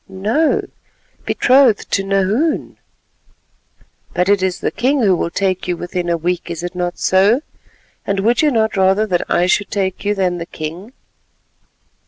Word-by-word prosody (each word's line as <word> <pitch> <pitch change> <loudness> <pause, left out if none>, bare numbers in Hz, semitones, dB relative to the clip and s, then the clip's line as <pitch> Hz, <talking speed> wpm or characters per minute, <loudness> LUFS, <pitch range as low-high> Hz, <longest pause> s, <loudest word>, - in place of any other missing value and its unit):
"No, 215 +12 0 0.6
betrothed 255 -4 +3
to 195 - +1
Nahoon." 195 - 0 1.4
"But 180 +2 +1
it 200 -1 +3
is 185 -1 -1
the - - -2
king 260 +3 0
who 195 -3 +4
will 170 - -2
take 185 +1 -1
you 175 -1 -1
within 175 0 -4
a 170 - +1
week; 175 +2 -2
is 170 0 -5
it 175 - -4
not 180 -1 -3
so? 200 +8 +3 0.6
And 195 0 -1
would 235 +4 +2
you 305 - +3
not 220 -4 0
rather 190 +2 +3
that 180 -5 -2
I 175 - +2
should 200 +3 +1
take 190 -2 -2
you 205 +1 0
than 180 -3 -1
the 170 - -6
king?" 170 +10 -7
195 Hz, 165 wpm, -17 LUFS, 180-215 Hz, 1.4 s, who